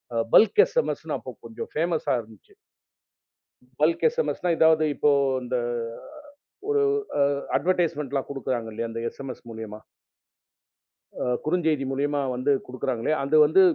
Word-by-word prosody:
அ 115 - +2
bulk 225 - +7
எஸ்எம்எஸ்னு - - -1
அப்ப - - -9
கொஞ்சம் 460 - -7
ஃபேமஸா 160 -3 0
இருந்துச்சு. 110 -2 -19 1.2
பல்க் 160 +2 +2
எஸ்எம்எஸ்னா, 480 - -2
ஏதாவது 160 -1 +5
இப்போ 145 - +3 0.3
இந்த 125 0 -2 1.1
ஒரு 430 0 +2 0.4
அ, - - +5 0.4
அட்வெர்ட்டிஸ்ட்மென்ட்லாம் 150 -7 -1
குடுக்குறாங்க 120 -4 -3
இல்லையா? 115 +2 -3
அந்த 115 0 -5
எஸ்எம்எஸ் 135 -2 -9
மூலியமா 110 -1 -8 1.4
அ - - 0 0.2
குறுஞ்செய்தி 155 -4 +1
மூலயமா 145 +2 0 0.2
வந்து 130 +3 +1
குடுக்குறாங்களே, 130 +1 -2
அந்த 145 +3 +1
வந்து 175 +6 +5
145 Hz, 120 wpm, -25 LUFS, 125-165 Hz, 1.4 s, பல்க்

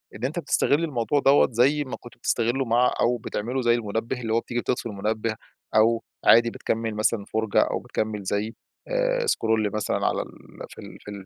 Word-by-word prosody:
إن 115 - -4
أنت 155 +6 -2
بتستغل 155 -2 +1
الموضوع 145 -2 0
دوّة 140 +1 +5
زي 135 +6 +3
ما 130 - -6
كنت 120 - -14
بتستغله 120 +3 0
مع 120 +2 +3
أو 120 +1 +2
بتعمله 120 +3 -3
زي 120 -1 +3
المنبه. 115 +2 -3
اللي 110 -2 -2
هو 115 - +3
بتيجي 120 +1 -4
بتطفي 125 - -2
المنبه 110 +1 -2 0.4
أو 115 +1 +4 0.2
عادي 115 0 +6
بتكمّل 115 -1 -3
مثلًا 105 -1 0
فُرجَة 110 -1 0
أو - - 0
بتكمّل 110 -2 -3
زي 105 +3 -2 0.3
آآ - - 0
سكرول 110 - +1
مثلًا 110 -1 -1
على - - 0
ال - - -7 0.4
في - - -12
ال - - -11
في 105 - -9
ال 100 -2 -9
115 Hz, 190 wpm, -25 LUFS, 110-130 Hz, 0.4 s, عادي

